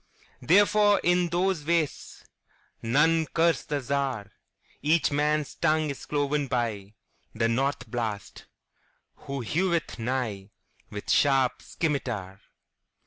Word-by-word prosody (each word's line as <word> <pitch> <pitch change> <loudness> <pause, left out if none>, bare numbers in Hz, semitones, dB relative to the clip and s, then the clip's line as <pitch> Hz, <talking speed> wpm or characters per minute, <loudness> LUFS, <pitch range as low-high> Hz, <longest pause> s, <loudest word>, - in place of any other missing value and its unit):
Therefore, 205 +3 +4
in 175 0 +2
those 180 0 0
wastesNone 160 -1 -1
curse 165 -2 +3
the 145 -1 -3
Czar.Each 140 +4 -2
man's 150 +1 0
tongue 155 -2 +1
is 140 - -9
cloven 145 -1 -1
byThe 110 -5 -2 0.6
North 135 0 -1
Blast, 110 -3 -5 0.7
who 140 -1 -6
heweth 170 - -1
nighWith 105 -4 -6
sharp 135 -3 +3
scymitar. 120 - -3
140 Hz, 85 wpm, -27 LUFS, 115-165 Hz, 0.7 s, Therefore